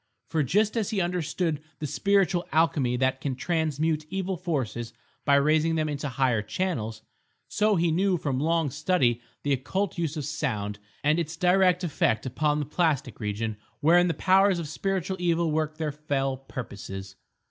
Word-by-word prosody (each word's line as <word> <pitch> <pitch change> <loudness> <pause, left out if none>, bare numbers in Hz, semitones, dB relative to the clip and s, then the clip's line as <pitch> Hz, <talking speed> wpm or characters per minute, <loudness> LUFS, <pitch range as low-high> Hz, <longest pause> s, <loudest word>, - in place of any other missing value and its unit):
For 160 - +1
just 205 - +2
as 220 -3 0
he 215 -3 -1
understood 175 -3 -1 0.2
the 155 - -4
spiritual 180 +4 +1
alchemy 145 -6 +2
that 130 +1 +1
can 135 -3 -2
transmute 155 +1 0
evil 190 +1 -2
forces 130 -10 -3 0.3
by 140 - +5
raising 155 +3 +3
them 155 -1 +1
into 145 -1 -3
higher 125 -3 +1
channels, 110 - -3 0.4
so 210 0 +2
he 170 -1 +2
knew 185 +2 +2
from 140 -5 -1
long 160 -1 +1
study 140 -6 +1 0.2
the 145 - +2
occult 170 +8 -2
use 160 -2 -1
of 150 - -3
sound, 110 -9 -2 0.2
and 150 +3 +3
its 160 0 -3
direct 180 0 +3
effect 140 -9 +1
upon 150 +4 0
the 150 - -1
plastic 150 -4 0
region 105 0 -3 0.2
wherein 175 +4 +5
the 165 - 0
powers 195 0 +4
of 170 -3 -4
spiritual 190 +3 -2
evil 170 -2 +1
work 155 0 -1
their 155 -2 -1
fell 140 -2 -1
purposes. 100 -7 -7
155 Hz, 165 wpm, -27 LUFS, 135-175 Hz, 0.4 s, by